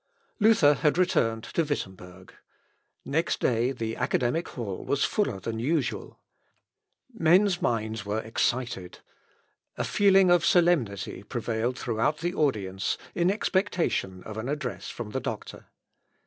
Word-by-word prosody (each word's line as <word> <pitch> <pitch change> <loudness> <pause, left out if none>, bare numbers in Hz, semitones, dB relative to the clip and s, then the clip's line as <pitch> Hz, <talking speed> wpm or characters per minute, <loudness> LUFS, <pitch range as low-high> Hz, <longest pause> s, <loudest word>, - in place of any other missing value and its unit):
Luther 205 -9 +5
had 150 +2 +1
returned 115 -11 +1
to 165 - -1
Wittemberg. 95 - -6 0.7
Next 160 +4 0
day 120 +1 +1
the 115 -3 -4
academic 130 +8 0
hall 105 -7 -5
was 140 - 0
fuller 205 - -1
than 110 +3 -4
usual. 145 +5 -1 1.0
Men's 185 -1 +3
minds 110 -2 -1
were 105 +1 -2
excited. 115 -4 -2 0.8
A - - -1
feeling 195 -3 +4
of 175 -1 +4
solemnity 165 - +2
prevailed 115 +2 -2
throughout 120 +6 0
the 175 +3 -2
audience, 100 - -1 0.2
in 175 +1 +2
expectation 185 - 0
of 110 0 -8
an 115 +4 -4
address 145 -4 -4
from 115 -3 -7
the 130 - -2
doctor. 115 -4 -6
125 Hz, 125 wpm, -27 LUFS, 110-170 Hz, 1.0 s, Luther